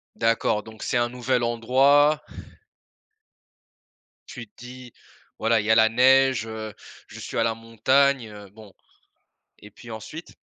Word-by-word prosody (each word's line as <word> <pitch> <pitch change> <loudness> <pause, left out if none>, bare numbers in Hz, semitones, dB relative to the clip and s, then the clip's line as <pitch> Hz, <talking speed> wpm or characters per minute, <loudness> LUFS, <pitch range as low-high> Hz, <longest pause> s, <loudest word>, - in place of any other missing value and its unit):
D'accord, 115 -2 0
donc 110 -1 -12
c'est - - -1
un 120 0 0
nouvel 125 0 -2
endroit 135 +6 +3 2.1
tu 120 -3 -9
te - - -46
dis: 125 0 -12 0.5
«Voilà, 115 0 +2
il 105 - -4
y 110 - +1
a - - +5
la 110 0 +5
neige, 130 -1 +3
heu, 110 -1 -7 0.3
je - - -12
suis - - -7
à - - +2
la 115 -1 -1
montagne, 120 +2 +1
heu, 105 -2 -12
bon». 105 -3 -16 0.9
Et 105 - -14
puis 115 +3 -14
ensuite? 150 +10 -10
115 Hz, 150 wpm, -23 LUFS, 110-130 Hz, 2.1 s, a